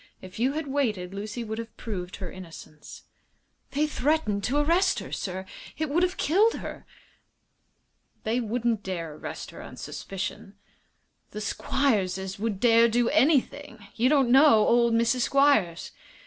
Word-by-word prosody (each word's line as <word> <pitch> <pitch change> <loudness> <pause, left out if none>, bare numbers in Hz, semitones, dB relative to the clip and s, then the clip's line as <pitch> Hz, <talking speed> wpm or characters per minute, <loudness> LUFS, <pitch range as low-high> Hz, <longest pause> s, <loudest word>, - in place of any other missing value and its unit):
If 185 +3 -11
you 260 +4 +1
had 315 +1 -3
waited 220 -10 -2
Lucy 210 +4 -5
would 220 0 -5
have 230 -1 -8
proved 185 -6 -5
her 185 -3 -7
innocence." 165 -4 -12 0.7
"They 295 +2 0
threatened 285 -8 0
to 270 +4 0
arrest 345 +6 +2
her, - - -6
sir. 190 0 -4 0.3
It 310 -2 -2
would 340 +4 +2
have 365 +1 0
killed 410 +9 +3
her." - - -8 1.4
"They 225 +3 0
wouldn't 230 -1 -1
dare 170 -5 -5
arrest 150 - -7
her - - -10
on - - -11
suspicion." 195 +1 -6 0.7
"The 210 - -7
Squierses 200 -5 -1
would 210 -3 -2
dare 230 0 +5
do 235 +1 +2
anything. 265 -6 +1
You 245 +3 +2
don't 275 -5 +3
know 265 -5 +6
old 235 -1 +3
Mrs. 235 +2 +2
Squiers." 275 -12 +2
230 Hz, 150 wpm, -26 LUFS, 195-280 Hz, 1.4 s, know